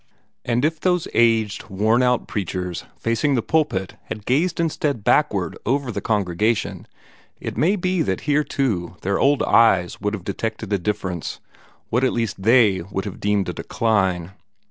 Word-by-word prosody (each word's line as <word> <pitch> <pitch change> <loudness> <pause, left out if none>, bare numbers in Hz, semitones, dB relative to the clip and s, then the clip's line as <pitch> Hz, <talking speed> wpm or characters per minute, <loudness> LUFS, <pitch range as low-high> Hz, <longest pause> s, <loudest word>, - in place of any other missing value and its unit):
And 120 +3 +1
if 160 0 0
those 180 -1 +1
aged, 115 -3 +2
worn 110 +5 +2
out 125 -1 +1
preachers 90 -3 -4
facing 115 +5 +1
the 120 - 0
pulpit 145 - 0
had 105 -1 -7
gazed 165 +8 +1
instead 150 -7 -1
backward - - +2
over 135 +1 0
the 100 -2 -4
congregation, 105 +1 0 0.5
it - - -5
may 180 +7 +2
be 185 -2 0
that 95 - -1
here 150 0 +2
too 95 - -2
their 100 +1 0
old 140 +1 +3
eyes 95 -6 +3
would 105 +1 -1
have 95 - -9
detected 105 +1 -4
a 100 - +2
difference 95 -3 -3 0.5
what 125 +3 +2
at 130 - +2
least 115 -4 -2
they 110 -4 +4
would 95 +1 -2
have 100 - -6
deemed 105 -1 0
a - - -3
decline. 95 -6 0
110 Hz, 165 wpm, -22 LUFS, 95-135 Hz, 0.5 s, they